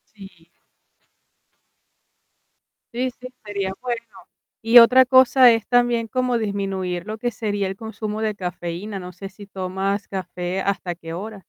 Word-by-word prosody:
Sí. 185 -5 -15 2.5
Sí, 255 +2 -1
sí, 255 - -8
estaría 205 -6 -5
bueno. 240 -2 -2 0.6
Y 230 +2 +6
otra 250 +2 +8
cosa 260 -1 +6
es 225 -2 0
también 240 -2 +2
como 250 0 0
disminuir 195 -4 -3
lo 215 +1 -5
que 240 +2 -2
sería 205 -2 -2
el 190 - -5
consumo 220 0 -5
de 215 -1 -1
cafeína, 180 +2 -5
no 180 0 -9
sé 195 +2 -8
si 200 +1 -14
tomas 195 +1 -3
café, 185 0 -4
hasta 185 -3 -2
qué 165 -1 -9
hora. 205 +4 -6
205 Hz, 140 wpm, -22 LUFS, 190-230 Hz, 2.5 s, otra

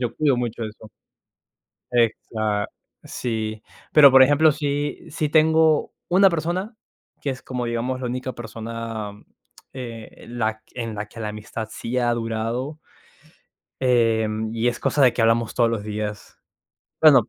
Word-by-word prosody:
yo 120 -3 -2
cuido 145 -4 +3
mucho 120 -2 -3
eso. 110 0 -10 1.0
Exa 110 -3 0 0.4
Sí. 110 -2 -4 0.3
Pero, 145 -3 +9
por 135 0 +8
ejemplo, 145 +3 +5
sí 145 0 -2
sí 150 0 -2
tengo 160 0 +4 0.2
una 190 +2 +6
persona 175 +6 -2 0.5
que 145 - -2
es 130 -1 -4
como, 125 0 -4
digamos, 120 +2 -2
la 125 - -2
única 130 +1 -4
persona, 115 -2 -6 0.6
eh, 115 -4 -8
la 110 -2 -2
en 115 -3 -4
la 105 0 -4
que 115 - -12
la 105 - -2
amistad 105 +1 -6
sí 115 +2 -4
ha 120 -1 +2
durado 115 +5 -3 1.0
em, 110 -3 +2
y 115 +1 0
es 120 - 0
cosa 145 - +1
de 125 -3 +6
que - - -1
hablamos 115 0 +2
todos 120 -2 +3
los 115 -3 -2
días. 105 0 -5 0.7
Bueno 140 -8 +7
120 Hz, 145 wpm, -23 LUFS, 110-135 Hz, 1.0 s, Pero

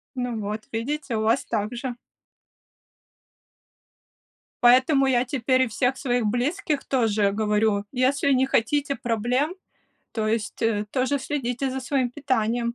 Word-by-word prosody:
Ну 245 -3 -3
вот, 210 +1 -4
видите, 255 +2 -3
у 215 - 0
вас 225 +4 +1
так 215 0 -2
же. 245 0 -4 2.7
Поэтому 260 +3 +5
я 250 -1 +2
теперь 255 0 +1
и - - 0
всех 250 +4 0
своих 245 -4 0
близких 290 - -1
тоже 215 -6 +1
говорю: 210 -1 +1
"Если 275 +2 +1
не 265 0 +3
хотите 275 +3 +1
проблем, 245 - -1 0.6
то 220 -2 -1
есть, 220 -1 -2
э, 215 -2 +1
тоже 265 +2 0
следите 265 -1 -2
за 265 +1 -4
своим 255 -1 0
питанием". 235 -3 -1
245 Hz, 130 wpm, -24 LUFS, 225-270 Hz, 2.7 s, Поэтому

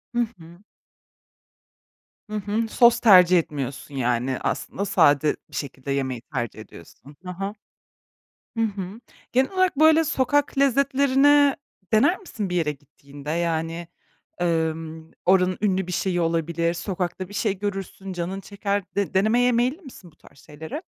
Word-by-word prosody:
Hı - - +1 0.2
hı. 165 +1 -14 1.7
Hı 215 - -5
hı. 210 +2 -1
Sos 235 +1 +4
tercih 185 -5 +7
etmiyorsun, 140 -2 -5
yani, 125 0 0
aslında 200 - -3
sade 145 -5 +3
bir - - -12
şekilde 140 -1 -5
yemeyi 130 -3 -2
tercih 120 -5 -5
ediyorsun. 110 - -14
Ha 180 0 -7
ha. 195 +1 -3 1.0
Hı 225 - +1
hı. 200 0 -5 0.3
Genel 260 +5 +2
olarak, 370 -4 +1
böyle, 315 +1 +6
sokak 285 0 0
lezzetlerini 280 +1 +4 0.4
dener 285 - +4
misin 220 - -6
bir 180 - -1
yere 155 -3 +1
gittiğinde? 145 0 -12
Yani, 165 0 -2 0.5
ımm, 160 -1 -2
oranın 185 0 +3
ünlü 190 -3 0
bir 180 - -5
şeyi 175 -1 0
olabilir, 170 0 0
sokakta 180 0 -4
bir 205 - -12
şey 205 -2 -1
görürsün, 195 -1 -5
canın 180 +2 -4
çeker. 200 0 -2
De 200 -5 -1
denemeye 235 +6 +3
meyilli 250 +9 0
misin 240 - -13
bu - - -29
tarz - - -20
şeyleri? 160 - -8
185 Hz, 140 wpm, -24 LUFS, 160-225 Hz, 1.7 s, tercih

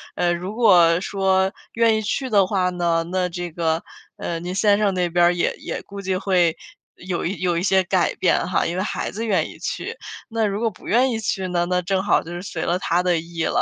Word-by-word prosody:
呃， 175 0 +1
如 180 +4 -5
果 180 -7 +5
说 190 -1 +1 0.3
愿 230 -1 +4
意 - - -1
去 255 +5 -2
的 200 -4 +4
话 185 -2 0
呢， 170 -2 0
那 180 0 0
这 175 0 -5
个， 165 0 0 0.4
呃， 170 - -3
您 180 +1 -4
先 200 +1 +3
生 205 -2 +1
那 180 -1 0
边 175 +1 +2
儿 175 - +3
也 175 - 0
也 - - -5
估 200 0 -9
计 190 -1 -1
会 180 -4 +2 0.4
有 180 -1 -4
一 190 +3 -3
有 175 -2 0
一 170 - -1
些 190 0 +4
改 180 0 +1
变 180 - +1
哈， 185 - +1
因 170 - -2
为 185 - -1
孩 - - -3
子 225 +4 -4
愿 205 -4 +1
意 - - -12
去。 - - -4 0.3
那 225 -2 0
如 200 0 -1
果 230 0 +1
不 185 - -15
愿 250 +4 +4
意 225 -3 -2
去 190 -3 -2
呢， 175 -1 0
那 180 0 +1
正 190 +1 -1
好 205 - +3
就 170 - -9
是 175 - -5
随 195 - -5
了 175 - +1
他 175 -1 +1
的 180 -1 +1
意 165 0 -4
了。 240 - +1
185 Hz, 260 characters per minute, -22 LUFS, 175-200 Hz, 0.4 s, 果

